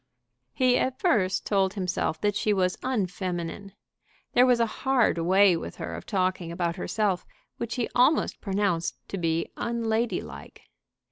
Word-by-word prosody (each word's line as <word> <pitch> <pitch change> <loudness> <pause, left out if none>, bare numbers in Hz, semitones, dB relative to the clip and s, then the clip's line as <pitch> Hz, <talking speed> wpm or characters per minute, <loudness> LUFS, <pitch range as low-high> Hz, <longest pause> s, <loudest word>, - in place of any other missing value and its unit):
He 255 -1 +3
at 260 0 -1
first 205 - +1
told 195 -1 +1
himself 180 -4 -1
that 205 -1 +1
she 210 - +1
was 185 -2 +1
unfeminine. 185 -4 -3 0.6
There 250 +1 +6
was 245 -1 +4
a 230 - +4 0.2
hard 260 -9 +2
way 185 +2 +5
with 165 - -6
her - - -6
of - - -8
talking 185 -4 -1
about 170 -1 -1
herself 200 -1 -1 0.3
which 235 0 -4
he 245 -3 -1
almost 255 +6 +2
pronounced 195 -4 -1
to 195 - -4
be 165 -1 0
unladylike. 230 0 -2
200 Hz, 145 wpm, -27 LUFS, 180-235 Hz, 0.6 s, There